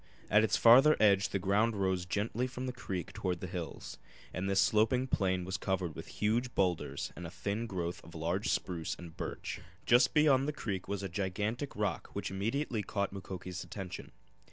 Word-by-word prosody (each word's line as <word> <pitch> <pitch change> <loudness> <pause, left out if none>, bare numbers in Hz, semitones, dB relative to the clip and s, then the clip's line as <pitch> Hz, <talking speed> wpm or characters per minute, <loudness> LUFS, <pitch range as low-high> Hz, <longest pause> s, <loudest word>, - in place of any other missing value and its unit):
At 105 +1 +6
its 110 0 +2
farther 130 +7 +7
edge 100 -2 +5
the - - 0
ground 105 +4 +2
rose 95 -3 0
gently 110 +6 -1
from 130 0 -5
the 125 - -3
creek 95 -8 -5
toward 90 -2 -2
the - - -5
hills, 90 -2 -6 0.3
and 95 +2 -2
this 95 0 +3
sloping 110 +6 +3
plain 95 -7 0
was 95 +1 -2
covered 95 -4 -1
with - - -8
huge 120 +4 0
boulders 90 -4 0
and 85 0 -6
a - - -7
thin 105 +6 -3
growth 90 -4 -4
of 85 +1 -13
large 85 +5 -1
spruce 85 -3 -1
and 85 -2 -11
birch. - - -5 0.2
Just 125 +4 +5
beyond 140 -3 +5
the 150 - -1
creek 100 -9 -4
was 100 -1 -3
a - - -1
gigantic 105 - -2
rock 105 -6 -2
which - - -3
immediately 110 +4 -1
caught 100 0 -2
Mukoki's 95 -1 -6
attention. 95 -3 -7
100 Hz, 185 wpm, -32 LUFS, 90-115 Hz, 0.3 s, farther